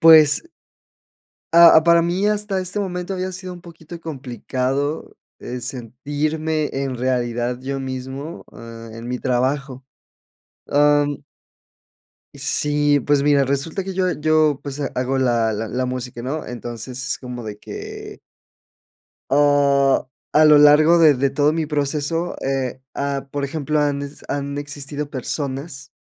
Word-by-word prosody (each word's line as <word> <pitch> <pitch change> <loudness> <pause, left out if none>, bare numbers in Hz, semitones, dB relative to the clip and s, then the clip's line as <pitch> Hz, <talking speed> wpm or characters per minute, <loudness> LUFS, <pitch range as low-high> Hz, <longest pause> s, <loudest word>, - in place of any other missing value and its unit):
pues 155 - +7 1.1
ah, 170 -1 +8
para 170 0 +5
mí 180 +4 0
hasta 210 -2 0
este 185 +3 -2
momento 180 -1 -3
había 185 0 -3
sido 185 0 -7
un 175 - -12
poquito 170 -1 -11
complicado, 135 0 -3 0.2
eh, 125 0 -6
sentirme 145 +6 -2
en 135 -1 -2
realidad 120 -1 -1
yo 135 +1 -4
mismo, 130 +4 -6
eh, 115 0 -10
en 115 +1 -8
mi 125 0 -2
trabajo, 130 +1 -1 0.9
am 145 0 +3 1.1
Sí, 145 -1 +1
pues 140 +2 +1
mira, 145 -1 +4
resulta 140 +8 -2
que 195 - -5
yo 185 -1 +1
yo 155 -2 +2
pues 140 0 -6
hago 130 +1 -1
la 120 -3 +2
la 110 +1 -3
la 130 +3 -2
música, 125 -1 -5
¿no?, 145 +5 -4
entonces 120 +1 -6
es - - -1
como 125 -2 -7
de 105 -1 -7
que - - -9 1.1
ah, 140 -2 +3 0.3
a 155 +1 +6
lo 150 -1 +8
largo 150 +3 +6
de 160 -3 +7
de 135 +1 +1
todo 145 +3 +2
mi 160 -1 -1
proceso, 150 +3 -1
eh 130 -1 -2
ah, 140 -1 -2
por 145 0 -3
ejemplo, 150 +1 -1
han 145 -1 0 0.3
han 140 0 -3
existido 145 0 -5
personas, 135 +1 -5
145 Hz, 135 wpm, -21 LUFS, 130-155 Hz, 1.1 s, ah